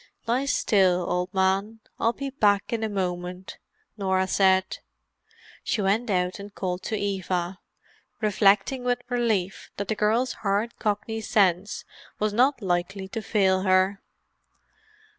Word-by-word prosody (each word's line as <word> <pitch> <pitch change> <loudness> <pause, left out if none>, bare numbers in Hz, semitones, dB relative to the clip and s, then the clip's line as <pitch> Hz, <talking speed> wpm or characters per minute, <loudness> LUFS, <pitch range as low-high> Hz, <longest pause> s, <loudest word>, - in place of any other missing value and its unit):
"Lie 245 +4 +1
still, 185 -9 +2
old 180 0 -1
man; 195 +3 0 0.2
I'll 230 - +3
be 275 +2 -5
back 205 -6 +2
in 225 -1 -1
a 220 - -1
moment," 180 -1 -4 0.4
Norah 190 -2 +1
said. 190 0 +2 0.8
She - - -1
went 210 +4 +1
out 180 0 0
and 200 0 -10
called 180 -1 -3
to 220 - -1
Eva, 190 -2 -2 0.6
reflecting 210 +4 +2
with 245 0 0
relief 225 -7 -1
that 200 -1 -4
the - - +2
girl's 225 +5 +1
hard 210 +3 -1
Cockney 220 +1 -2
sense 195 -3 +1 0.3
was 215 0 0
not 250 +1 +2
likely 190 +1 -1
to 225 - -4
fail 190 -3 +2
her. 190 +1 +2
200 Hz, 135 wpm, -25 LUFS, 190-220 Hz, 0.8 s, I'll